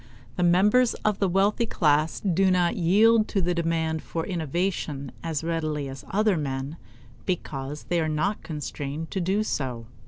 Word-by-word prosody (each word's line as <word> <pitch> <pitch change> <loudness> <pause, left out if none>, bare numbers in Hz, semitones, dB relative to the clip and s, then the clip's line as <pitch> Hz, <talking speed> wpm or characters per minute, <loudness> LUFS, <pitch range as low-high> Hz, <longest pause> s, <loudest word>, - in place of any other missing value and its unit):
The - - -2
members 205 +8 +4
of 210 -2 +1
the 195 - +2
wealthy 200 +5 +2
class 155 -4 +1
do 190 0 +2
not 180 -2 +2
yield 215 +6 +4
to 200 - -1
the 180 -1 +1
demand 165 -2 -1
for 165 -1 -4
innovation 160 -5 -2
as 160 -2 -3
readily 155 -3 -2
as 135 -1 -8
other 210 -1 +2
men 140 +1 -3 0.5
because 145 -5 -3
they 175 -1 0
are 160 - 0
not 155 +7 -1
constrained 150 0 -5
to 190 - -1
do 195 +5 +1
so. 125 - -3
165 Hz, 160 wpm, -26 LUFS, 150-195 Hz, 0.5 s, members